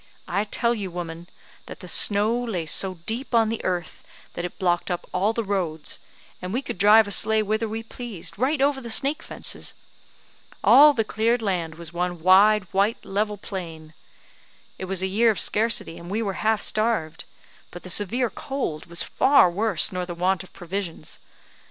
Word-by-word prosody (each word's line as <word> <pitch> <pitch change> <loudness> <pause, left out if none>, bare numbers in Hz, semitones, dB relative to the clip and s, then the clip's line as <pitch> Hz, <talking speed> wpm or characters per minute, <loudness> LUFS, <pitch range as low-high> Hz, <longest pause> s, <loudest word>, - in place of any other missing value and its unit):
I 200 +2 -1
tell 235 +3 0
you, 205 -5 -4
woman, 170 0 -7 0.4
that - - -9
the 180 - -10
snow 205 +5 +3
lay 225 -9 -3
so 185 +4 +2
deep 240 +3 -3
on 225 -1 +4
the 225 - -4
earth, 175 -3 -3 0.3
that 175 - -5
it 180 - -6
blocked 175 -2 0
up 175 -1 -3
all 195 +4 +1
the 230 0 -2
roads, 175 -7 -2 0.4
and 180 0 -5
we 250 +6 -2
could 185 - -6
drive 210 +2 +6
a - - -6
sleigh 220 +2 +3
whither 215 +2 -1
we 225 +1 -5
pleased, 225 -6 -8
right 275 +4 +1
over 280 -1 +1
the 235 - -8
snake 280 +7 0
fences. - - -6 0.9
All 295 +2 +8
the 225 - +1
cleared 225 +2 0
land 175 -6 -2
was 170 0 -8
one 175 0 -2
wide 195 +4 +5
white 200 +4 0
level 210 +1 -2
plain; 165 -6 -8 0.9
it 190 - -4
was 190 0 -3
a - - +2
year 220 +5 +3
of 215 - 0
scarcity, 215 -6 +1
and 170 - -10
we 215 +4 -1
were 200 -2 -2
half 220 -1 +1
starved; 215 -8 0 0.4
but 175 - -11
the 185 - -7
severe 225 +6 -1
cold 260 - -4
was 170 0 -2
far 265 -9 +4
worse 195 -4 +3
nor 180 -1 -4
the 175 - -6
want 185 +2 0
of 185 - -13
provisions. 175 -3 -6
200 Hz, 185 wpm, -24 LUFS, 175-225 Hz, 0.9 s, All